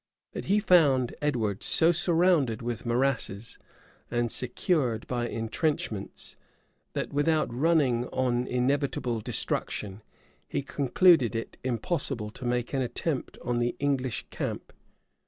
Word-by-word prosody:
But - - -5
he 205 +2 +3
found 145 - +4
Edward 115 -9 0
so 165 +1 +5
surrounded 170 - +2
with 120 0 -4
morasses, 120 -3 -1 0.5
and 120 -1 0
secured 125 - 0
by 120 -1 -2
intrenchments, 115 -3 -3 0.6
that, - - -3
without 150 -2 +1
running 130 -4 +2
on 125 -1 0
inevitable 125 -2 0
destruction, 105 -1 -3 0.5
he - - -2
concluded 140 - +3
it 115 - -5
impossible 125 - -2
to 125 - -9
make 120 +1 -1
an 135 - +1
attempt 130 +3 -3
on 120 -1 0
the 120 0 0
English 135 -5 -1
camp. - - -5
125 Hz, 120 wpm, -28 LUFS, 120-150 Hz, 0.6 s, so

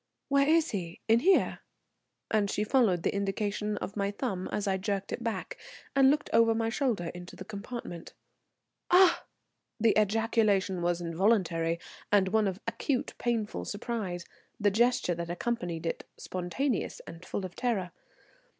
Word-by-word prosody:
"Where 280 0 +4
is 325 0 +4
he? 175 -5 -4
In 225 +1 +5
here?" 380 +9 +3 0.7
and 210 -2 +2
she 210 - 0
followed 210 -8 +3
the - - +1
indication 205 +1 -1
of 200 - -5
my 200 -1 0
thumb 200 -3 -3
as 205 -1 -1
I 190 -1 +2
jerked 200 0 -2
it - - -4
back, 235 - -3 0.4
and 270 -1 +6
looked 295 +1 +1
over 230 0 +5
my 225 0 0
shoulder 225 - -1
into 175 0 -9
the 190 - -9
compartment. 200 -4 -7 0.7
"Ah!" 360 0 +5 0.5
The 225 0 +4
ejaculation 210 -3 +2
was 175 0 0
involuntary, 170 -2 +1 0.3
and 195 -2 +4
one 215 0 +3
of 190 0 -3
acute 245 +3 -1
painful 230 -3 -1
surprise, 205 -5 -4 0.3
the 205 -1 +3
gesture 235 -3 +2
that 170 0 -5
accompanied 175 -3 -2
it 165 - -2
spontaneous 185 +8 -2
and 165 +2 -10
full 190 - -4
of 180 - -8
terror. 205 -8 -1
205 Hz, 150 wpm, -30 LUFS, 185-235 Hz, 0.7 s, and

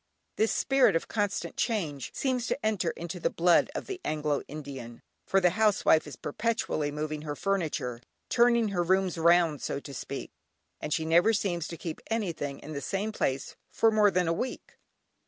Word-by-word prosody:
This 220 - +2
spirit 270 -9 +3
of 165 - 0
constant 205 -2 -2
change 165 - -1
seems 255 -3 -1
to 275 - -2
enter 210 -6 +1
into 170 +2 -6
the - - +1
blood 175 0 +3
of - - -3
the 385 -2 -6
Anglo 150 -2 -1
Indian, 135 -6 -8 0.2
for 195 - +4
the 180 -2 +4
housewife 205 -7 +3
is 145 - -8
perpetually 155 - -1
moving 150 0 -3
her 150 -1 -4
furniture, 155 -11 -2 0.3
"turning 235 -2 +4
her 185 -3 0
rooms 185 0 +1
round" 170 -2 +4
so - - -2
to 140 - -9
speak, - - -6 0.5
and - - -5
she 160 - 0
never 170 +7 +4
seems 175 -5 -1
to 170 - -7
keep 160 -1 -6
anything 170 -11 -2
in 155 - -8
the 140 - -4
same 200 +6 -2
place 135 -10 -2
for 225 - +3
more 210 -1 +5
than 180 -2 +1
a 165 - +2
week! 250 +9 -4
175 Hz, 180 wpm, -29 LUFS, 150-215 Hz, 0.5 s, more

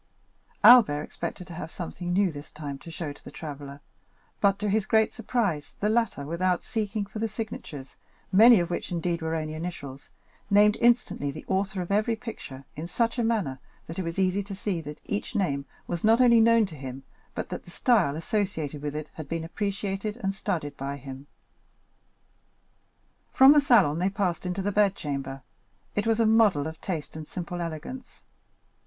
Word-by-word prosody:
Albert 210 -12 +8
expected 170 +3 -6
to 175 - -10
have 160 -1 -6
something 175 +1 -5
new 190 0 +3
this 145 -1 -9
time 145 -2 -7
to 170 - -11
show 160 -3 -5
to - - -20
the - - -9
traveller, 145 -2 -8 0.6
but, 200 -1 +3
to 210 +1 -2
his 210 0 +1
great 220 -1 +3
surprise, 205 -10 -1
the 210 - +1
latter, 230 -10 0
without 175 +3 0
seeking 215 -3 -2
for 205 +2 -8
the 225 - 0
signatures, 210 - -7 0.3
many 225 +3 +8
of 175 0 -2
which, 175 - -3
indeed, 170 0 -1
were 160 0 -1
only 155 -1 -3
initials, 155 -5 -7 0.4
named 210 +1 +5
instantly 235 -11 +2
the 140 - -7
author 190 -1 0
of 175 - -7
every 215 +3 +2
picture 215 - -8
in 155 +3 -5
such 230 +6 0
a - - +2
manner 205 - 0 0.3
that 165 +3 -7
it - - -1
was 165 +1 -4
easy 190 +1 +2
to 200 0 -7
see 190 -3 -2
that 150 -1 -8
each 205 - -3
name 140 -9 0 0.2
was 175 -1 -4
not 225 +2 +5
only 235 -2 +6
known 230 -1 +5
to 190 - -10
him, 135 -1 -7 0.3
but - - -4
that - - -5
each - - -11
style 210 - +3
associated 165 - -2
with 145 0 -4
it 150 0 -5
had 155 -3 -8
been 165 -1 -2
appreciated 200 +3 -3
and 195 0 0
studied 150 -6 -3
by 140 +1 -4
him. 135 +1 -9 2.0
From 265 +1 +8
the 295 0 +6
salon 200 - +4
they 185 +2 +2
passed 190 -3 -1
into 180 +2 -2
the 205 - 0
bedchamber; 140 -10 0 0.5
it 205 +2 0
was 225 0 +2
a 230 - +4
model 215 -9 +4
of 160 0 -7
taste 165 -6 -4
and 155 -1 -7
simple 175 0 -5
elegance. 170 - -7
180 Hz, 185 wpm, -27 LUFS, 155-210 Hz, 2.0 s, Albert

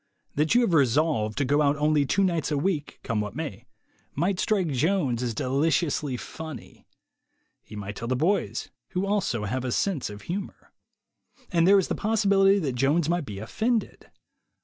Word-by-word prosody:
That 155 +9 +1
you 245 - +6
have 230 -7 +1
resolved 135 -5 +2
to 145 - +1
go 145 +3 +2
out 145 0 +3
only 150 -1 +2
two 195 +8 +2
nights 170 -6 0
a 150 - 0
week, 155 -1 -2
come 115 -4 -1
what 105 +2 -5
may, 150 -11 -6 0.5
might 180 +5 0
strike 195 -6 +1
Jones 140 -3 +1
as 120 -3 -2
deliciously 145 - 0
funny. 155 -3 -9 0.7
He 110 - -12
might 100 0 -6
tell 115 - -5
the 130 - 0
boys, 175 +10 0 0.2
who 180 +2 0
also 195 - 0
have 125 +5 -2
a 125 - -2
sense 170 - 0
of 105 0 -10
humor. 195 +3 -6 0.8
And 170 0 +3
there 200 +1 +7
is 190 - +2
the - - -1
possibility 200 -2 +3
that 150 -9 -1
Jones 145 +6 +1
might 175 -3 0
be 105 -4 -7
offended. 220 - -2
150 Hz, 175 wpm, -26 LUFS, 125-185 Hz, 0.8 s, there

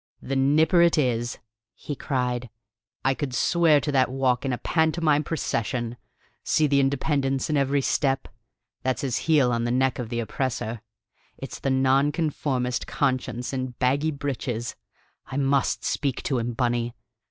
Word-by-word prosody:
"The 135 - -4
Nipper 150 +6 +4
it 170 -1 +4
is!" 120 -4 0 0.4
he 145 - -6
cried. 125 -3 -2 0.6
"I 135 - +4
could 135 -2 -4
swear 165 +3 +4
to 145 - -2
that 130 -3 +3
walk 130 -1 +1
in 135 - 0
a 125 - -1
pantomime 160 -1 +2
procession! 120 -6 -2 0.5
See 155 - +2
the 140 -1 +3
independence 135 0 0
in - - +1
every 140 0 +2
step: 135 0 0 0.5
that's 130 +1 -1
his 130 -4 0
heel 140 -6 +5
on 115 0 0
the 120 - 0
neck 130 +2 +1
of 120 -3 -4
the 120 0 -2
oppressor: 120 -1 -3 0.6
it's - - -7
the - - -1
nonconformist 135 -1 +1
conscience 130 -4 -1
in 130 -1 -3
baggy 140 +5 +2
breeches. 130 -5 -3 0.5
I 130 - -5
must 140 -1 +1
speak 140 -4 -1
to 130 -4 0
him, 120 +1 -2
Bunny. 120 0 -1
135 Hz, 155 wpm, -25 LUFS, 125-145 Hz, 0.6 s, heel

